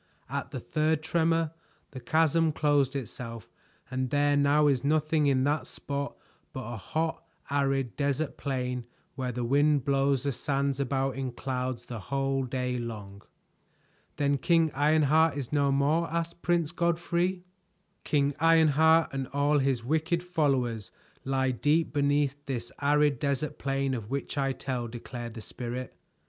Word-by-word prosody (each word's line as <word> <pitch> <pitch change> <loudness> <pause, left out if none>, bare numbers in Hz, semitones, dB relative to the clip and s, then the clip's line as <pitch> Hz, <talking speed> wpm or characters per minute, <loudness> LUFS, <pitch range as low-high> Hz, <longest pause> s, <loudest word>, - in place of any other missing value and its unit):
At - - -3
the - - -5
third 155 0 0
tremor, 165 -1 +1 0.4
the 130 - -7
chasm 160 +4 +2
closed 145 -3 +2
itself 115 -3 -6 0.4
and 130 0 -1
there 145 +1 +2
now 145 +1 +4
is 135 -4 +2
nothing 155 +1 +2
in 130 -2 +3
that 145 +2 0
spot 140 0 -4 0.4
but 120 -3 -5
a - - -5
hot 160 - -2 0.3
arid 135 -3 0
desert 140 +1 -1
plain 125 -3 -3 0.3
where 130 -2 -3
the 125 0 -3
wind 145 +2 +3
blows 135 -1 +2
the 140 - 0
sands 140 +1 -1
about 135 0 -1
in 130 -2 -2
clouds 125 -1 -3
the 120 -2 -6
whole 135 +3 -1
day 125 -1 -2
long." 105 -4 -7 0.9
"Then 140 -1 +1
King 165 0 +3
Ironheart 155 +2 +3
is 140 -1 -5
no 140 -1 +3
more?" 150 +5 +2
asked 170 +1 -3
Prince 170 -3 +1
Godfrey. 175 +1 0 0.6
"King 145 -1 +1
Ironheart 160 0 +4
and 135 -1 -2
all 145 +2 +2
his 130 -4 0
wicked 160 +5 0
followers 135 - 0 0.3
lie 130 -1 +1
deep 150 +5 +1
beneath 145 0 +1
this 120 -3 -4
arid 145 -2 +3
desert 140 0 -2
plain 135 0 -1
of 110 -4 -5
which 140 +1 -3
I 135 -1 +1
tell," 130 -3 -3
declared 120 0 -7
the 115 - -7
Spirit. 125 +2 -6
140 Hz, 150 wpm, -28 LUFS, 130-155 Hz, 0.9 s, now